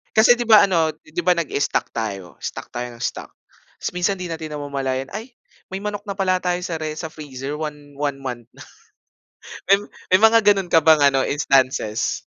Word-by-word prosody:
Kasi 230 +3 +7
'di 240 - -2
ba 215 -3 +7
ano, 165 -4 +2
'di 155 +2 -6
ba 180 - +4
nag-i-stock 165 -4 0
tayo? 100 -6 -4
Stock - - -5
tayo 120 0 -5
nang 115 0 -9
stock. - - -4 0.5
Tapos - - -3
minsan 180 +2 0
'di 180 - -4
natin 160 -2 -6
namamalayan, 135 -3 -3
ay 225 +4 -7 0.4
may 190 - -3
manok 205 0 -4
na 200 -1 -6
pala 185 -1 +2
tayo 180 0 0
sa 180 -2 -4
re 155 -1 -3
sa 160 - -4
freezer 145 -2 -7
one 150 -2 -7
one 140 -1 -2
month 125 -4 -6
na. - - -21 1.1
May 195 - +8 0.3
may 185 - +6
mga 225 +1 +6
ganun 200 -2 +3
ka 165 -2 +4
bang 160 0 +6 0.2
ano 135 - +3
instances? 130 -6 +1
155 Hz, 190 wpm, -21 LUFS, 135-190 Hz, 1.1 s, May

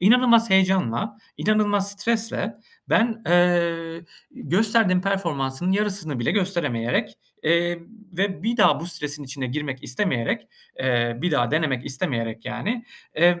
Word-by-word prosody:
inanılmaz 230 +2 +5
heyecanla, 190 - +2 0.2
inanılmaz 205 -2 +1
stresle 225 +2 -1 0.3
ben, 225 0 +2
eee, 170 -1 +2 0.3
gösterdiğim 195 +2 +2
performansın 175 -4 -1
yarısını 195 -9 -1
bile 120 - 0
gösteremeyerek, 170 - -1 0.2
eee, 170 +1 +2 0.3
ve 190 -2 -2
bir 230 +3 0
daha 210 - +4
bu 170 - -5
stresin 150 -4 -4
içine 135 0 -5
girmek 135 0 -4
istemeyerek, 125 - -1 0.4
ııı, 120 0 0
bir 180 - +1
daha 120 -6 +1
denemek 145 -5 0
istemeyerek, 115 -4 -3
yani, 235 +4 -3 0.4
ııı, 175 0 +5
175 Hz, 120 wpm, -23 LUFS, 140-205 Hz, 0.4 s, inanılmaz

